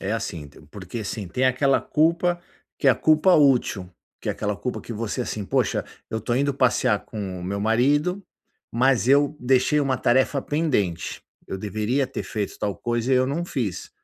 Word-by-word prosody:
é, 95 +3 -2
assim, 85 -9 -4 0.2
porque, 100 +3 -7
assim, 100 -2 -5
tem 125 +8 -1
aquela 130 +1 +3
culpa 170 +3 +1 0.4
que 140 - -1
é - - +9
a - - +4
culpa 155 +4 +4
útil, 125 - +3 0.3
que - - -5
é - - +2
aquela 105 -1 -3
culpa 125 +5 -4
que 115 - -8
você, 115 +3 -3
assim: 110 -3 -3
"Poxa, - - 0 0.2
eu 110 - -2
estou 120 +2 -2
indo 140 0 +1
passear 125 -4 +2
com 95 -5 -6
o - - -7
meu 100 +2 -3
marido, 145 - +2 0.5
mas 125 -1 +2
eu 145 +2 +4
deixei 130 +4 +3
uma 135 -2 +1
tarefa 130 +2 +2
pendente. 125 - -1 0.3
Eu 95 - -5
deveria 110 +7 -1
ter 130 - -5
feito 105 -3 -4
tal 100 -4 -2
coisa 120 +2 -1
e - - +5
eu 130 0 +3
não 155 +6 -2
fiz". 120 - -4
125 Hz, 190 wpm, -24 LUFS, 105-140 Hz, 0.5 s, é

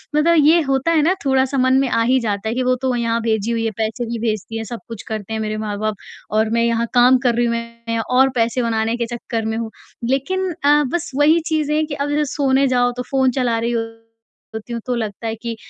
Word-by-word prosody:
मतलब 335 +3 +4
ये 330 +3 +6
होता 275 +3 0
है 315 -2 +3
ना 340 +5 +3
थोड़ा-सा 265 0 +2
मन 260 0 +3
में 270 - +1
आ 230 - +1
ही 260 +1 +3
जाता 210 -2 -2
है 230 - -2
कि 255 - 0
वो 255 0 +2
तो 260 -2 0
यहाँ 230 -1 0
भेजी 220 0 0
हुई 230 -1 -1
है, 225 - 0
पैसे 225 +2 -2
भी 230 0 -4
भेजती 215 +1 -3
है, 225 - -3
सब 235 +2 -6
कुछ 230 -3 -8
करते 220 -1 -5
हैं 220 - -2
मेरे 215 0 -2
माँ-बाप 215 0 -2 0.4
और 220 0 +2
मैं 230 0 +2
यहाँ 235 0 +1
काम 250 +1 +6
कर 235 -1 +3
रही 240 0 +2
हूँ, 235 - 0
मैं 230 0 -5
और 255 +4 +3
पैसे 235 +2 +1
बनाने 225 0 0
के 235 - -1
चक्कर 225 -1 -4
में 220 0 -2
हूँ, 225 -1 -4 0.4
लेक़िन 370 +8 0
अ, 295 +1 +5
बस 345 -5 -2
वही 305 +4 +4
चीज़ 305 -2 0
है 310 +1 +2
कि 300 - -6
अब 285 +1 -2
जब 300 - +2
सोने 275 -1 +3
जाओ 245 -1 +2
तो 250 - -2
फ़ोन 265 -1 +3
चला 235 -2 +1
रही 235 +1 -1 0.8
होती 220 +2 -6
हूँ 230 - -4
तो 250 -1 -1
लगता 220 0 -4
है 225 - -2
कि 230 0 -5
235 Hz, 250 wpm, -19 LUFS, 225-270 Hz, 0.8 s, ये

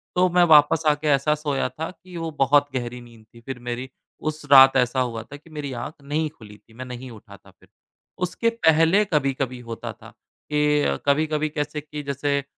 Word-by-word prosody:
तो 180 +1 +4
मैं 175 0 +4
वापस 155 +1 +5
आके 150 +1 +1
ऐसा 145 +2 +3
सोया 145 -4 -2
था 155 +6 -6
कि 180 -1 -13
वो 165 -1 -4
बहुत 145 +1 +4
गहरी 125 -1 -4
नींद 115 -2 -16
थी 115 - -15
फ़िर 130 0 -7
मेरी, 120 +2 -5 0.3
उस 155 0 -4
रात 135 0 +9
ऐसा 125 +1 +1
हुआ 115 -3 -2
था 135 +6 -12
कि 160 +3 -20
मेरी 150 -3 -6
आँख 155 - -7
नहीं 150 +2 -2
खुली 105 -8 -15
थी, 110 - -25
मैं 130 +2 -8
नहीं 125 +1 -8
उठा 110 -3 -13
था - - -20
फ़िर। - - -26 0.5
उसके 180 +6 0
पहले 165 -2 +3
कभी-कभी 135 -6 -1
होता 115 - -5
था - - -15 0.4
कि 150 - +2
कभी-कभी 155 +1 +1
कैसे 150 0 -4
कि 150 0 -8
जैसे 140 0 -1
145 Hz, 195 wpm, -23 LUFS, 130-155 Hz, 0.5 s, रात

